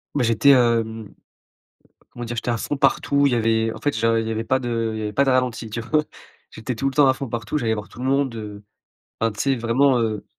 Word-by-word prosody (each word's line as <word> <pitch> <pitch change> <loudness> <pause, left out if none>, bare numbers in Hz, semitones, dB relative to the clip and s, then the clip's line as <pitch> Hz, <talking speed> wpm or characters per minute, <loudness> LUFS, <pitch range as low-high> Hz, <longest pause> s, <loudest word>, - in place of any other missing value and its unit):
bah, 135 - +1
j'étais, 115 +4 +3
hem, 115 -4 +1 1.0
comment 120 - -7
dire? 120 +1 -5
J'étais 120 - -3
à 115 - -1
fond 145 - -3
partout 140 0 +2
il 125 - 0
y - - +3
avait 115 -1 +1
en - - -10
fait 145 - -1
j'en 115 0 +2
il 110 0 -1
y - - -2
avait 110 +1 -2
pas 130 +3 +1
de 115 -2 -2
il - - -4
y - - -4
avait 105 - -4
pas 140 - +2
de 135 - +2
ralenti 125 -3 0
tu 115 +2 -4
vois? 150 +6 +1 0.5
J'étais 115 +3 -5
tout 135 +4 -1
le - - -9
temps 145 -2 +5
à 130 - +4
fond 135 0 -6
partout, 115 +5 -3
j'allais 115 -2 0
voir 105 0 -7
tout - - -14
le 130 - -4
monde, 135 -3 +1
heu, 105 -2 -8 0.6
enfin 115 0 +2
tu 110 - -10
sais 135 -1 +2
vraiment, 125 +3 +2
heu 110 -2 -2
115 Hz, 265 wpm, -22 LUFS, 110-135 Hz, 1.0 s, temps